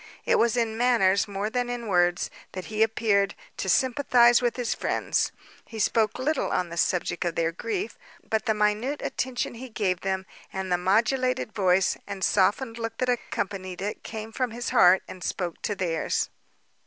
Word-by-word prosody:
It - - +3
was 235 +1 +2
in 225 -1 0
manners, 220 -5 +3
more 200 +1 -3
than 245 0 -1
in 245 -1 -4
words, 175 -3 +2 0.2
that 185 -1 -6
he 215 - 0
appeared 220 -3 +2 0.2
to - - -2
sympathise 250 -2 +4
with 240 -2 0
his 245 -2 -1
friends: - - 0 0.3
he 225 - -10
spoke 220 +1 +1
little 290 +3 0
on 180 - 0
the 170 - -7
subject 175 +1 0
of 170 -2 -2
their 165 0 +1
grief; 400 - -4 0.3
but 220 +2 -1
the 220 - +2
minute 210 +7 0
attention 250 -1 -2
he 250 +2 -8
gave 190 -5 -1
them, 190 0 -2 0.3
and 190 -1 -4
the 180 - +4
modulated 235 +6 +1
voice, 190 -3 +2
and 200 -2 -5
softened 225 +6 +2
look 225 0 -4
that 255 - 0
accompanied 195 -6 -3
it, 205 - -4
came 220 0 -7
from 255 +2 -1
his 235 +1 -4
heart, 180 +1 +6
and 185 - -9
spoke 175 -3 -3
to 205 - -2
theirs. 170 -4 -1
215 Hz, 180 wpm, -26 LUFS, 190-240 Hz, 0.3 s, heart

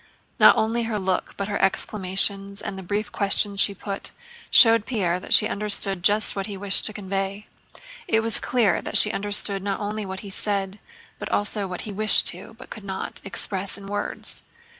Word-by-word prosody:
Not - - +7
only 230 +1 -1
her 225 -2 -3
look, 190 -2 -3
but 200 - -4
her 205 - -3
exclamations 195 0 +1
and - - -4
the 190 - -8
brief 205 +3 -4
questions 200 0 +1
she 200 0 +6
put, 195 +1 -6 0.4
showed 225 -2 +6
Pierre 180 -8 -1
that - - -12
she 215 - +5
understood 200 -2 +1
just 210 +3 +3
what 195 0 -4
he 200 -2 -7
wished 200 0 0
to - - -7
convey. 195 0 -5 0.6
It 225 0 +1
was 225 0 0
clear 240 -4 0
that - - +3
she 210 - +5
understood 200 -1 +1
not 200 0 -4
only 210 +1 -5
what 190 -1 -6
he 200 - -10
said 195 0 -3 0.4
but - - -7
also 205 -1 -2
what 180 -1 -6
he 215 - -7
wished 215 0 +4
to, 190 +5 -10
but - - -15
could 215 - -10
not, 190 -1 -6
express 195 -1 0
in 200 - -12
words. 205 +1 -5
200 Hz, 190 wpm, -23 LUFS, 195-210 Hz, 0.6 s, Not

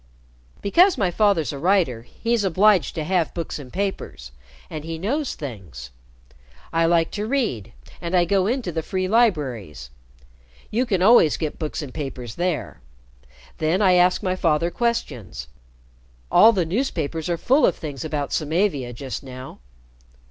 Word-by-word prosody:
"Because 350 - +4
my 190 -4 +1
father's 180 - +2
a 140 - -6
writer, 170 - +2
he's 230 - -2
obliged 195 +1 +3
to 160 - -2
have 175 0 0
books 170 -3 -4
and 130 -3 -10
papers, 190 - -4 0.4
and 155 -1 -7
he 165 0 -5
knows 265 - -2
things. 90 - -8 0.8
I 165 0 +3
like 165 -1 +2
to 210 +1 -3
read, 175 - -2 0.3
and 170 +1 -2
I 175 -1 +4
go 190 +1 +2
into 240 -5 -1
the 160 0 -2
free 185 +3 -2
libraries. 130 - 0 0.8
You 245 +4 0
can 190 -5 +1
always 205 -7 +6
get 155 -3 -4
books 155 -1 -3
and 130 -3 -9
papers 130 -6 -6
there. 175 0 -3 0.8
Then 160 +4 +1
I 190 -3 +4
ask 180 +2 +3
my 185 -1 0
father 170 -1 +1
questions. 125 - -3 0.8
All 225 - +8
the 190 -6 0
newspapers 165 - -2
are 170 - 0
full 270 - +2
of 175 - +4
things 145 -3 -6
about 150 -3 -3
Samavia 155 -5 0
just 130 +2 -6
now." 130 -1 -10
170 Hz, 155 wpm, -23 LUFS, 140-200 Hz, 0.8 s, All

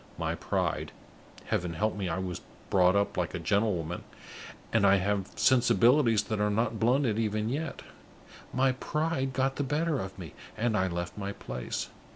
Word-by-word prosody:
My - - -1
pride - - -2 0.5
(Heaven 90 -1 -1
help 110 +6 0
me, 100 -3 -2
I 80 - -1
was 95 -2 -4 0.3
brought 90 0 +5
up 100 0 +1
like 90 0 -1
a - - -3
gentlewoman, 90 -2 0 0.7
and 115 -2 +3
I 100 0 +6
have 100 0 0
sensibilities 120 -2 +4
that 110 0 -3
are 105 0 +2
not 110 +1 0
blunted 120 -1 +2
even 110 0 0
yet!) 155 +6 -3 0.7
my 130 0 +3
pride 135 +1 -1
got 135 +1 0
the 145 - 0
better 150 +2 0
of 95 -2 -6
me, 90 -4 -8 0.2
and 115 -1 +1
I 95 -2 +2
left 85 +2 -4
my 100 0 -3
place. 65 -10 -5
105 Hz, 170 wpm, -29 LUFS, 95-130 Hz, 0.7 s, I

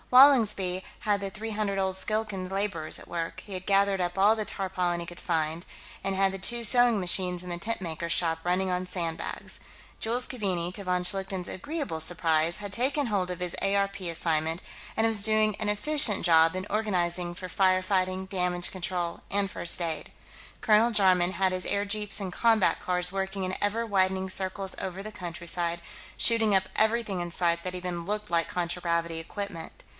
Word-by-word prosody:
Wallingsby 220 -9 +5 0.2
had 205 -1 0
the 195 - -3
three 220 +3 -6
hundred 205 -2 -2
odd 190 -1 -1
Skilkan 210 -2 -2
laborers 195 -5 0
at - - -12
work; 170 +1 -5
he 200 - -9
had 185 0 -5
gathered 195 -1 +3
up 175 +1 -2
all 205 +3 +5
the 215 - -2
tarpaulin 180 -4 -2
he 170 - -5
could 175 +1 -10
find, 160 0 -1 0.4
and 195 0 -1
had 195 0 +2
the 195 - -6
two 235 +4 +3
sewing 240 0 +6
machines 180 -1 0
in - - -7
the 175 0 -4
tentmaker's 170 -5 -3
shop 165 -2 +1
running 185 +2 0
on 180 0 -1
sandbags. 170 -3 -4 0.4
Jules 240 +3 +1
Keaveney, 185 -7 -2
to 200 - -5
von 180 -1 0
Schlichten's 190 0 -2
agreeable 280 - -3
surprise, 165 0 +2
had 205 -1 -6
taken 275 +6 +1
hold 190 -4 -1
of 180 - -5
his 180 -1 -3
ARP 200 0 0
assignment, 165 -1 0 0.4
and 225 - +3
was 220 -3 +2
doing 215 -1 +2
an 215 -1 -1
efficient 210 - +3
job 165 0 +5
in 185 +2 -5
organizing 180 -5 -1
for 185 +1 -6
fire 185 +1 +2
fighting, 185 0 0
damage 180 -2 0
control 175 -2 -3
and 200 -1 0
first 175 -1 0
aid. 165 -2 -3 0.5
Colonel 220 +2 +4
Jarman 185 -4 +3
had 190 +1 +1
his 185 0 -3
airjeeps 205 +1 +1
and 190 -3 -5
combat 225 -3 +2
cars 180 0 +2
working 195 0 -2
in 185 - -3
ever 220 +3 0
widening 190 -2 0
circles 190 0 +1
over 190 +1 -5
the 215 +2 -7
countryside, 170 -1 -3 0.4
shooting 225 -3 +3
up 190 -1 +3
everything 220 -4 +1
in 175 0 -5
sight 170 -1 0
that 185 0 -4
even 180 -1 -4
looked 210 +1 -3
like 170 -1 +1
contragravity 170 -1 -2
equipment. 175 0 -7
190 Hz, 180 wpm, -27 LUFS, 175-205 Hz, 0.5 s, sewing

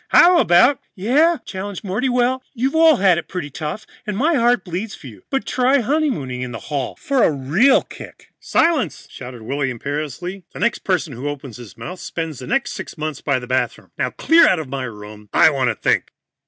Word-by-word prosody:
How 350 0 +6
about 245 - +5
" - - -57
"Yeah?" 290 - +3
challenged 190 0 -6
Morty. 205 +7 -1
"Sure, 250 +1 +1 0.2
you've 260 +3 0
all 320 -1 +6
had 190 -6 +3
it - - -9
pretty 175 -6 -5
tough, 155 +9 -5 0.2
and 210 -2 -2
my 310 +8 +2
heart 240 -4 +2
bleeds 190 +4 -4
for - - -15
you. 105 -7 -11
But 270 - -1
try 260 +2 +2
honeymooning 240 - -1
in 125 -1 -4
the 115 - -5 0.2
hall 135 -3 -2
for 280 -6 0
a - - +5
real 160 - +3
kick." - - -13
"Silence!" 330 -5 +1
shouted 125 -3 -9
Willy 135 +3 -1
imperiously. 150 - -5
"The - - -9
next 235 -1 +1
person 180 -6 -1
who 130 +5 -4
opens 135 -5 -7
his 120 -4 -12
mouth 180 0 -7
spends 165 -5 -5
the 125 - -8
next 270 -3 0
sixth - - -7
months 155 -2 -4
by 140 -3 +1
the 125 - -6
bathroom. 130 +1 -2
Now - - -1
clear 330 +1 +5
out 185 - +3
of 160 -3 -5
my 135 -1 -3
room. 105 -2 -10
I 160 - +6
want 135 -3 0
to 115 - -1
think." - - +1
180 Hz, 210 wpm, -20 LUFS, -, 0.2 s, How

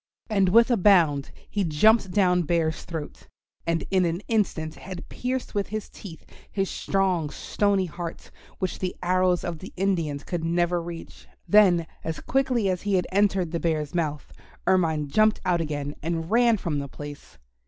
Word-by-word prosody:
And 195 -3 +3
with 230 +6 +5
a 240 - +4
bound 170 -8 +4 0.2
he 205 - -1
jumped 190 +6 +4
down 180 -2 +3
Bear's 160 -1 -1
throat, 160 -4 -7 0.4
and 165 0 +1
in 190 -1 +3
an 170 +2 -1
instant 175 -8 0
had 185 -1 -9
pierced 255 +1 -3
with 200 -1 -1
his 215 0 -5
teeth 165 -6 -11 0.3
his 195 -1 -1
strong 185 -6 0
stony 200 +5 0
heart, 170 0 -7 0.3
which 185 -2 -3
the 185 -1 -3
arrows 180 0 +2
of 170 -2 -4
the 190 - -9
Indians 170 -7 -1
could 175 -2 -4
never 175 +1 +1
reach. 170 0 -9 0.2
Then 185 -5 +5 0.2
as 160 0 -4
quickly 255 -5 +1
as 185 -2 -1
he 205 -1 0
had 180 - +1
entered 195 -3 +2
the 170 - -1
Bear's 155 -2 -1
mouth 150 -4 -2 0.3
Ermine 160 -5 +2
jumped 215 +8 +3
out 175 -2 +2
again 145 -2 -3
and 165 +2 -3
ran 235 -1 +4
from 160 -6 -2
the 140 - -4
place. 145 - -10
180 Hz, 170 wpm, -25 LUFS, 160-195 Hz, 0.4 s, with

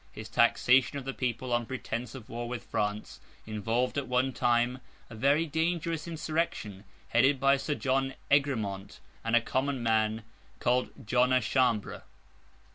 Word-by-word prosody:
His 110 - -9
taxation 125 +4 +3
of 135 - -6
the 135 - -3
people, 125 0 -2
on 120 -1 0
pretence 125 -2 -4
of 125 -4 -10
war 120 +1 -5
with 125 -1 -5
France, 105 -1 -3 0.3
involved, 115 +5 -1
at 140 - -5
one 125 +1 +1
time, 120 +2 +1 0.3
a - - -8
very 140 +8 +3
dangerous 165 0 -1
insurrection, 155 - -3 0.2
headed 135 +3 +3
by 140 +1 +4
Sir 145 +2 -2
John 135 -1 0 0.2
Egremont, 110 -9 0 0.2
and 115 +1 +1
a 120 - +5
common 130 +1 -1
man 110 -1 +1 0.4
called 125 +1 +1 0.2
John 125 +3 +3
à 130 0 +4
Chambre. 120 -3 0
125 Hz, 150 wpm, -29 LUFS, 115-135 Hz, 0.4 s, a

